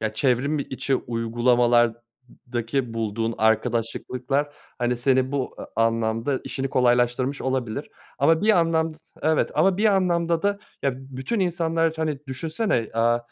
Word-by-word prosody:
ya, 110 -1 -2
çevrim 130 +6 +1
içi 135 0 -2
uygulamalardaki 120 +1 0
bulduğun 115 0 -2
arkadaşlıklar, 120 +5 0 0.3
hani, 120 0 0
senin 130 +1 +1
bu 135 -3 -2
a - - -7 0.2
anlamda 115 +3 -1
işini 135 0 -3
kolaylaştırmış 125 +2 +2
olabilir. 130 -4 -2 0.3
Ama 160 +5 +3
bir 215 -3 +5
anlamd 165 -1 +1 0.3
Evet. 155 0 +2
Ama 180 +5 +3
bir 210 - 0
anlamda 170 -4 +2
da, 200 0 +1 0.2
ya, 140 - +1
bütün 135 - -4
insanlar, 165 -2 +1
hani, 155 -3 -1
düşünsene, 155 - -1
aaa, 115 +1 +3
130 Hz, 125 wpm, -24 LUFS, 120-160 Hz, 0.3 s, bir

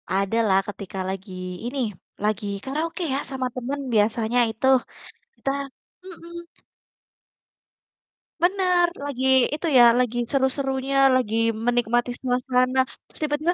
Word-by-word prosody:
Adalah 195 0 +1
ketika 190 -2 -6
lagi 185 -1 -6
ini, 245 -4 -2 0.3
lagi 210 -1 -1
karaoke 320 +6 -3
ya, 270 - 0
sama 260 -2 -3
temen 260 +3 -4
biasanya 220 +2 +2
itu. 225 +4 -2 0.7
Kita 275 - -2 0.5
mhm. 340 -1 -10 2.0
Benar. 360 -1 +3 0.2
Lagi 265 -2 -3 0.3
itu 310 +3 -2
ya, 245 - +9 0.2
lagi 245 -1 0
seru-serunya, 270 0 0 0.2
lagi 225 -4 0 0.3
menikmati 240 0 +1
suasana 255 0 +1 0.3
terus - - -14
tiba-tiba 305 +3 0
250 Hz, 105 wpm, -24 LUFS, 220-280 Hz, 2.0 s, ya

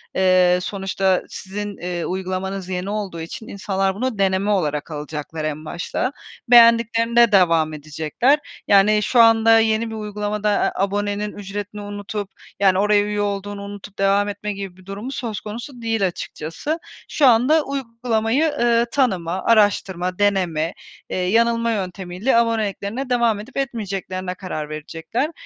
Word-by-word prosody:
eee, 185 -1 +4
sonuçta 190 -1 0
sizin, 205 +1 -6
ııı, 175 -1 -3
uygulamanız 190 0 -3
yeni 185 +1 -3
olduğu 200 -5 -4
için 170 +7 -8
insanlar 195 -1 -1
bunu 245 0 -2
deneme 195 +1 +1
olarak 150 -6 -1
alacaklar 150 +1 -5
en 155 0 -4
başta. 175 - -3 0.4
Beğendiklerinde 235 0 +5
devam 165 -5 +4
edecekler 155 - 0 0.3
yani 210 +1 +5
şu 245 - +2
anda 225 0 +6
yeni 220 +1 +1
bir 220 - -6
uygulamada 210 0 -2
a 200 -1 +1
abonenin 205 +1 -1
ücretini 205 +1 -6
unutup 205 0 -5 0.3
yani 190 -1 +4
oraya 205 0 +4
üye 210 0 -2
olduğunu 200 0 -3
unutup 200 0 -9
devam 200 +1 +3
etme 205 0 -4
gibi 195 -2 -7
bir 185 - -18
durumu 205 +7 -6
söz 225 -6 -4
konusu 235 +6 -7
değil 225 -4 +1
açıkçası. 175 - -5 0.3
Şu 285 - +3
anda 255 +7 +4
uygulamayı, 235 0 -1
ııı, 235 0 +3
tanıma, 190 -9 0
araştırma, 195 -4 +2
deneme, 180 -5 +1 0.4
eee, - - -3
yanılma 230 +5 +2
yöntemiyle 190 +3 -1
aboneliklerine 225 +2 -1
devam 235 -4 +2
edip 245 +7 -10
etmeyeceklerine 195 -8 -3
karar 155 -5 -5
verecekler. 165 - -3
205 Hz, 135 wpm, -21 LUFS, 185-225 Hz, 0.4 s, anda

